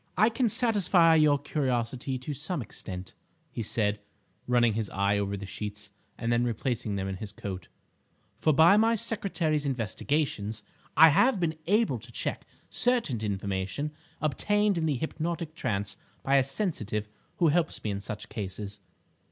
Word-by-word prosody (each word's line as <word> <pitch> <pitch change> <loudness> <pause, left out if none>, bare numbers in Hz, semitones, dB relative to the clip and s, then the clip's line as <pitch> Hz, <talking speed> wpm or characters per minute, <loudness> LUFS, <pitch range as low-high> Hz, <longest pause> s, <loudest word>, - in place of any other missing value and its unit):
"I 215 +4 +5
can 235 0 +1
satisfy 195 -7 +4
your 150 -2 +5
curiosity 130 -3 -1
to 130 +4 -5
some 160 +5 -3
extent," 95 -6 -7 0.4
he - - -4
said, 105 -1 0 0.5
running 120 -2 +4
his 110 -1 -2
eye 100 +1 +1
over 100 0 -2
the 100 - -6
sheets, 105 +1 -6 0.3
and 115 +1 0
then 120 +1 +3
replacing 120 -2 -1
them 95 -1 -2
in 95 -1 -4
his 100 +1 -7
coat; 95 -3 -6 0.7
"for 155 - +3
by 160 +7 +7
my 225 +1 +4
secretary's 175 -9 0
investigations 115 -2 -1 0.3
I 160 +1 +10
have 230 - +4
been 165 -2 0
able 215 +4 +2
to - - -14
check - - -4 0.2
certain 235 - +1
information 100 +6 -2 0.3
obtained 205 - +2
in 160 - 0
the 150 - +1
hypnotic 165 +2 -3
trance 100 -9 -2 0.3
by 140 +1 +4
a 135 - +5
'sensitive' 130 - -2 0.3
who 170 -3 +3
helps 165 +1 0
me 105 - -1
in 100 - -3
such 105 +1 -6
cases. 100 0 -6
130 Hz, 155 wpm, -28 LUFS, 105-165 Hz, 0.7 s, I